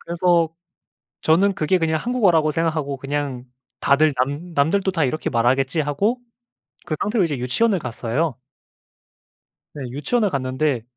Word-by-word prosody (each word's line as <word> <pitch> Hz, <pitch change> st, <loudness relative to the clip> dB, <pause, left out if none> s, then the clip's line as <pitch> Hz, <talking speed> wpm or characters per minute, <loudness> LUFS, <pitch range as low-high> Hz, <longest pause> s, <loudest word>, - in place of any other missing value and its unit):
그래서 170 Hz, -1 st, +2 dB, 0.7 s
저는 190 Hz, +6 st, +3 dB
그게 175 Hz, +4 st, +1 dB
그냥 160 Hz, -1 st, +1 dB
한국어라고 190 Hz, -11 st, +2 dB
생각하고 155 Hz, -3 st, -1 dB
그냥 135 Hz, -2 st, -3 dB, 0.4 s
다들 145 Hz, +1 st, +3 dB
"남 155 Hz, +6 st, -7 dB
남들도 190 Hz, +7 st, +2 dB
다 165 Hz, -5 st, 0 dB
이렇게 155 Hz, +5 st, -1 dB
말하겠지." 130 Hz, +5 st, +1 dB
하고 195 Hz, -, 0 dB, 0.7 s
그 155 Hz, -, -2 dB
상태로 210 Hz, -2 st, +1 dB
이제 150 Hz, -5 st, -1 dB
유치원을 185 Hz, -, +1 dB
갔어요. 125 Hz, +3 st, -2 dB, 1.4 s
네. 145 Hz, -, -6 dB
유치원을 195 Hz, -, 0 dB
갔는데 130 Hz, -1 st, -1 dB
155 Hz, 310 characters per minute, -22 LUFS, 135-175 Hz, 1.4 s, 저는